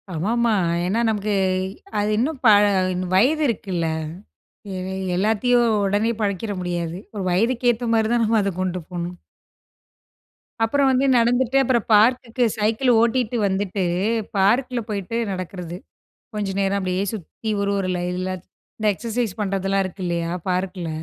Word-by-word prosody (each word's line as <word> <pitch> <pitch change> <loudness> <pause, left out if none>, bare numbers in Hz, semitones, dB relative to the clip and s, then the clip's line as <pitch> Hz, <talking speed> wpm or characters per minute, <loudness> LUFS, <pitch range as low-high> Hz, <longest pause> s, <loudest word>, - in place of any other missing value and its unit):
ஆமாமா. 225 +8 +1 0.3
ஏன்னா 195 +6 0
நமக்கு, 210 -1 -1 0.7
அது 205 +1 0
இன்னும் 270 +5 -1
பல 205 -1 +7 0.5
வயது 285 +11 +3
இருக்குல்ல. 190 -7 -2 0.9
எ - - -4 0.4
எல்லாத்தையும் 225 +5 +2 0.2
ஒடனே 205 +3 +1
பழக்கிட 205 +1 -1
முடியாது. 175 -1 -3 0.2
ஒரு 200 - -3
வயதுக்கு 240 +6 +2
ஏத்தா 235 +1 -5
மாரி 220 -1 +3
தான் 240 -1 +2
நம்ம 220 0 +3
அத 200 - 0
கொண்டு 185 -1 -1
போணும். 175 0 -4 1.5
அப்புறம் 270 +4 +3
வந்து 260 +1 +2
நடந்துட்டு. 245 +2 +2
அப்புறம் 240 -3 +1
பார்க்குக்கு, 240 +2 +3
சைக்கிள் 220 +4 +2
ஓட்டிட்டு 240 0 +1
வந்துட்டு, 195 0 -1 0.5
பார்க்கில 245 +6 +2
போயிட்டு 205 +2 -3
நடக்கிறது. 180 -2 -6 0.6
கொஞ்சம் 200 -2 -2
நேரம் 195 0 +1
அப்படியே 185 0 -1
சுத்தி, 215 +3 -8
ஒரு, 200 - 0
ஒரு 190 -1 -1
லைன்ல. 180 +1 -2 0.5
இந்த 215 - -1
எக்ஸர்சைஸ் 230 -1 -3
பண்ணுறதெல்லாம் 195 -1 0
இருக்கு 185 +1 -7
இல்லையா, 170 -1 -1 0.2
பார்க்கில. 180 -1 -2
205 Hz, 130 wpm, -22 LUFS, 185-235 Hz, 1.5 s, பல